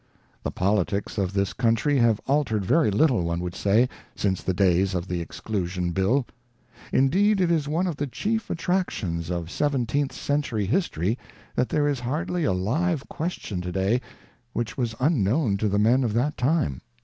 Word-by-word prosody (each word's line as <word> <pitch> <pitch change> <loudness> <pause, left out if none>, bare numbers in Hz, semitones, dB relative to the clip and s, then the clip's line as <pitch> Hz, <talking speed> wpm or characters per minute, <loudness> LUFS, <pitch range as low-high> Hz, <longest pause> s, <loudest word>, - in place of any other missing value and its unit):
The - - -2
politics 100 +2 0
of 95 -2 0
this 100 -1 0
country 125 +4 +2
have 115 -3 +3
altered 130 -8 +1
very 155 - +3
little, 120 - +3
one 85 0 -1
would 90 0 -4
say, 105 +7 +3 0.3
since 95 -2 0
the - - -1
days 95 0 +2
of 90 +1 -2
the 90 -2 -2
Exclusion 90 0 -3
Bill. 100 +9 +2 0.7
Indeed 195 +10 +3
it 180 -2 +2
is 155 -4 +1
one 165 +5 0
of 170 -6 -2
the 145 - -2
chief 220 - -2
attractions 115 - -1
of 85 -1 -3
Seven 140 -4 0
teenth 140 +4 -1
Century 140 -8 -1
history 115 - 0 0.3
that 125 - 0
there 145 -1 +2
is 140 -3 0
hardly 155 +7 -2
a - - +2
live 135 - 0
question 150 - -4
to 90 0 -4
day 95 +7 +1 0.5
which 120 -1 -2
was 120 -4 -2
unknown 125 - +2
to 105 +1 0
the 100 - +1
men 120 +6 +4
of 115 -4 0
that 130 +6 +1
time. 125 - 0
115 Hz, 175 wpm, -25 LUFS, 95-145 Hz, 0.7 s, men